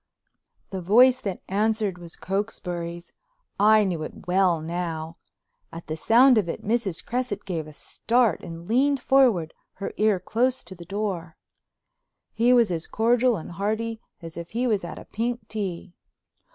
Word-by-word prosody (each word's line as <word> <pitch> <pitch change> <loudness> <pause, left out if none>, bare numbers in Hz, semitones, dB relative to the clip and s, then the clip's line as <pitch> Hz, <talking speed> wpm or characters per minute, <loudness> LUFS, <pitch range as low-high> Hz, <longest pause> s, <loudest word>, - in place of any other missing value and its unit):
The 190 -1 -4
voice 250 +8 +5
that 195 -5 -4
answered 210 -1 0
was 170 -1 -10
Cokesbury's; 175 -4 -4 0.5
I 215 +1 +6
knew 180 -5 -2
it 155 - -8
well 180 -2 +3
now. 165 0 -4 0.5
At 165 +1 -9
the 155 - -4
sound 235 - +5
of 180 -5 -2
it - - -5
Mrs. 210 -5 -1
Cresset 250 +1 -3
gave 165 -5 -3
a - - -10
start 230 +5 0
and 170 0 -9
leaned 270 +4 +2
forward, 240 -14 +3 0.2
her 195 - -6
ear 210 -3 +3
close 245 +7 0
to - - -9
the 170 -2 -11
door. 185 -4 -4 1.0
He 235 +3 +3
was 235 -6 +4
as 165 -1 -3
cordial 235 +1 +2
and 165 - -8
hearty 220 +5 -2 0.2
as 165 0 -9
if 170 0 -7
he 240 +3 -1
was 215 -6 +1
at 170 - -7
a - - -10
pink 235 0 -3
tea. 190 -4 -5
200 Hz, 160 wpm, -25 LUFS, 170-230 Hz, 1.0 s, I